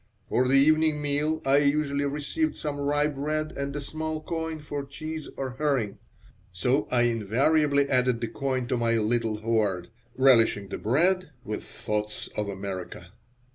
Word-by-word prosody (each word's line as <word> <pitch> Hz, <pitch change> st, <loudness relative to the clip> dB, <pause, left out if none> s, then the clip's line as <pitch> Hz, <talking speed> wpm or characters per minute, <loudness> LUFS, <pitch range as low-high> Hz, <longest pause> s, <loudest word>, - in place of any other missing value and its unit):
For 125 Hz, +1 st, +2 dB
the 135 Hz, -, +3 dB
evening 155 Hz, +2 st, +4 dB
meal 145 Hz, +2 st, 0 dB
I 135 Hz, +1 st, +5 dB
usually 145 Hz, 0 st, +2 dB
received 150 Hz, -, -1 dB
some 145 Hz, -2 st, -4 dB
rye 145 Hz, +1 st, +1 dB
bread 150 Hz, +1 st, -2 dB
and 140 Hz, 0 st, -4 dB
a 145 Hz, -, -3 dB
small 155 Hz, +2 st, -4 dB
coin 160 Hz, 0 st, -4 dB
for 145 Hz, -1 st, -5 dB
cheese 155 Hz, +2 st, -6 dB
or 135 Hz, -1 st, -3 dB
herring, 135 Hz, -9 st, 0 dB, 0.5 s
so 125 Hz, +11 st, +1 dB
I 120 Hz, -1 st, +3 dB
invariably 140 Hz, +6 st, +2 dB
added 125 Hz, -3 st, +2 dB
the 115 Hz, -, -2 dB
coin 130 Hz, +1 st, -2 dB
to 125 Hz, -, +1 dB
my 115 Hz, -1 st, +1 dB
little 110 Hz, -1 st, 0 dB
hoard, 105 Hz, -5 st, 0 dB, 0.3 s
relishing 115 Hz, -6 st, +4 dB
the -, -, -5 dB
bread 175 Hz, -, +2 dB, 0.2 s
with 105 Hz, -2 st, -4 dB
thoughts 105 Hz, 0 st, -4 dB
of 105 Hz, -1 st, -2 dB
America. 95 Hz, -3 st, -6 dB
140 Hz, 155 wpm, -27 LUFS, 115-150 Hz, 0.5 s, I